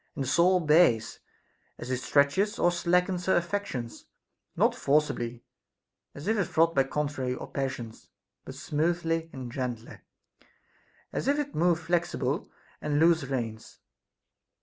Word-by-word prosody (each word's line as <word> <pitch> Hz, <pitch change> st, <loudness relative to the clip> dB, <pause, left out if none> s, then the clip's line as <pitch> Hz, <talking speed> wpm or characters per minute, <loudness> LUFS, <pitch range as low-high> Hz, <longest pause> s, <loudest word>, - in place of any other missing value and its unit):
And 140 Hz, -, -2 dB
the -, -, -4 dB
soul 175 Hz, +7 st, +4 dB
obeys, 150 Hz, -9 st, +3 dB, 0.6 s
as 125 Hz, -, -6 dB
it 130 Hz, -, +1 dB
stretches 145 Hz, +11 st, +2 dB
or 175 Hz, -, +3 dB
slackens 180 Hz, +1 st, 0 dB
her 190 Hz, -, +4 dB
affections, 170 Hz, -10 st, -3 dB, 0.5 s
not -, -, +3 dB
forcibly, 125 Hz, -5 st, 0 dB, 0.7 s
as 145 Hz, +5 st, -8 dB
if 220 Hz, +1 st, +2 dB
it 175 Hz, -3 st, -3 dB
wrought 165 Hz, +1 st, +5 dB
by 135 Hz, -3 st, +3 dB
contrary 135 Hz, -3 st, -2 dB, 0.2 s
passions, 130 Hz, -5 st, -5 dB, 0.3 s
but -, -, -9 dB
smoothly 165 Hz, +1 st, -1 dB
and 130 Hz, -3 st, -7 dB
gently, 120 Hz, -3 st, -5 dB, 1.1 s
as -, -, -3 dB
if 285 Hz, +1 st, +3 dB
it 290 Hz, -1 st, -3 dB
moved 170 Hz, +1 st, +2 dB
flexible 170 Hz, -5 st, -1 dB, 0.3 s
and 150 Hz, -1 st, 0 dB
loose 160 Hz, -2 st, +4 dB
reins. 115 Hz, -5 st, -5 dB
150 Hz, 130 wpm, -28 LUFS, 130-175 Hz, 1.1 s, wrought